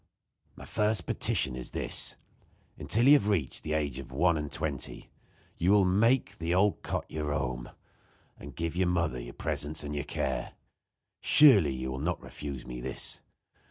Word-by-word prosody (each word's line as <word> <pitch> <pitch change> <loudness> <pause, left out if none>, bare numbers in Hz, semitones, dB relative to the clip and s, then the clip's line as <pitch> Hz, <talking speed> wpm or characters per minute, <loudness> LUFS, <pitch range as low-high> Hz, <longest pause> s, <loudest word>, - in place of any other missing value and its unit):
My - - -11
first 105 -4 0
petition 65 -2 0
is 65 -1 -6
this: - - -1 0.6
Until 115 +3 +1
you 140 - +9
have 105 -8 +4
reached 85 -10 -1
the 75 - -3
age 70 -4 -1
of 65 -1 -9
one 85 +6 +3
and 75 -2 -4
twenty 75 -4 -4 0.5
you 85 - +2
will 100 -1 +5
make 115 +7 +2
the 85 +1 0
old 100 +2 +2
cot - - -3
your 75 -1 -3
home, 60 -4 -2 0.7
and 70 0 -11
give 85 -1 -2
to 90 - -4
your 95 - +3
mother 85 -8 0
your - - -9
presence 75 +1 -2
and 75 0 -5
your 75 -1 -2
care. - - -3 0.7
Surely, 100 - +6
you 65 0 -4
will 65 - -4
not 85 +5 -1
refuse 70 -4 -7
me - - -7
this. 65 +1 -5
75 Hz, 175 wpm, -29 LUFS, 65-95 Hz, 0.7 s, you